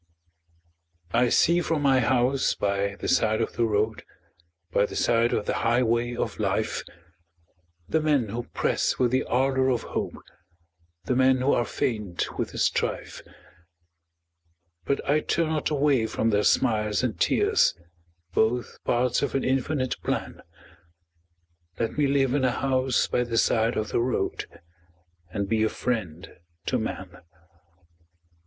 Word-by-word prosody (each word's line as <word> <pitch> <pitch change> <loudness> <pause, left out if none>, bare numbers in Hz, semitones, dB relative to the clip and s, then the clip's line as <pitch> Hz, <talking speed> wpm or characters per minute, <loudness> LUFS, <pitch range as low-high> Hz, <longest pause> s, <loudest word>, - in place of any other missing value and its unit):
I 120 +1 +3
see 170 +7 +3
from 165 -3 -1
my 135 -2 +4
house 130 +2 +2
by 100 0 -1
the - - -6
side 110 -1 +2
of - - -2
the 120 - +1
road 110 0 0 0.7
By 100 - +2
the - - -9
side 115 0 +2
of - - -1
the - - -1
highway 120 +1 +1
of - - -3
life, - - -1 1.1
The 160 - +1
men 145 -8 +1
who 120 +3 -4
press - - -1
with 125 -2 +2
the 130 +1 +2
ardor 130 +1 +1
of 125 -3 0
hope, - - -4 0.9
The 125 - 0
men 130 0 +4
who 135 +2 +3
are 120 - +1
faint 105 -7 -3
with - - -1
the - - -8
strife, - - -1 1.6
But 140 - -1
I 150 +2 +3
turn 160 +1 0
not 155 -2 -1
away 140 -6 +2
from 115 +1 0
their 105 0 +2
smiles 105 -3 +2
and 120 -5 -2
tears, - - +3 0.6
Both 120 +4 0
parts 125 0 +1
of 140 - -2
an 135 - +1
infinite 130 0 -1
plan - - -3 1.4
Let 115 - -2
me 145 -1 +2
live 135 -2 +2
in 140 -2 +1
a 130 - +4
house 130 0 +1
by 125 - 0
the 115 -1 -3
side 115 +1 +2
of 110 -1 -2
the - - 0
road 125 +1 -1 0.8
And 100 +2 -3
be 110 +1 +1
a 110 - +3
friend 95 -8 -4 0.3
to - - 0
man. - - -5
125 Hz, 150 wpm, -26 LUFS, 110-135 Hz, 1.6 s, my